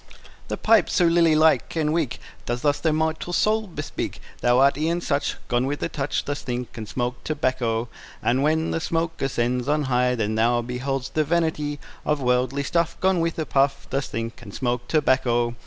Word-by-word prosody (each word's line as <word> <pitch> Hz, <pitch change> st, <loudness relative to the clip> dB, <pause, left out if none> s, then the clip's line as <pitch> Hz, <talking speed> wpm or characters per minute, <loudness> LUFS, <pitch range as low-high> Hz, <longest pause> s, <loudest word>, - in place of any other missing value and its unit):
The -, -, -3 dB
pipe 220 Hz, -4 st, +4 dB
so 175 Hz, -, +3 dB
lily 165 Hz, -1 st, +4 dB
like 155 Hz, +2 st, +3 dB
and 155 Hz, -1 st, +1 dB
weak, 160 Hz, -7 st, 0 dB, 0.3 s
Does 120 Hz, 0 st, -2 dB
thus 145 Hz, -1 st, +2 dB
thy 165 Hz, -, +1 dB
mortal 160 Hz, +2 st, -1 dB
state 215 Hz, -1 st, +1 dB
bespeak; 150 Hz, -, -4 dB, 0.2 s
Thou 120 Hz, 0 st, +3 dB
art 140 Hz, +2 st, +5 dB
e'en 160 Hz, +4 st, 0 dB
such, 145 Hz, -4 st, -1 dB
Gone 125 Hz, +1 st, +1 dB
with 145 Hz, +1 st, -3 dB
a -, -, -1 dB
touch: 145 Hz, -3 st, -2 dB
Thus 145 Hz, 0 st, -3 dB
think, 125 Hz, -2 st, -4 dB
and 110 Hz, -3 st, -6 dB
smoke 125 Hz, 0 st, -3 dB
tobacco. 125 Hz, -6 st, -1 dB, 0.4 s
And 125 Hz, +3 st, +2 dB
when 160 Hz, +2 st, +1 dB
the -, -, 0 dB
smoke 165 Hz, 0 st, -2 dB
ascends 125 Hz, -1 st, 0 dB
on 150 Hz, +1 st, +2 dB
high, 125 Hz, -1 st, +2 dB
Then 110 Hz, -2 st, -1 dB
thou 120 Hz, +2 st, +2 dB
behold'st 130 Hz, +2 st, -3 dB
the 155 Hz, -, +2 dB
vanity 150 Hz, -2 st, 0 dB, 0.2 s
Of 150 Hz, -1 st, 0 dB
worldly 125 Hz, +2 st, +1 dB
stuff, 170 Hz, +4 st, 0 dB
Gone 190 Hz, -1 st, +2 dB
with 165 Hz, 0 st, -1 dB
a 160 Hz, -, -1 dB
puff: 135 Hz, -1 st, +1 dB
Thus 135 Hz, 0 st, -1 dB
think, 115 Hz, +1 st, -5 dB
and 105 Hz, -4 st, -10 dB
smoke 120 Hz, -1 st, -2 dB
tobacco. 130 Hz, -5 st, +2 dB
140 Hz, 190 wpm, -24 LUFS, 125-160 Hz, 0.4 s, art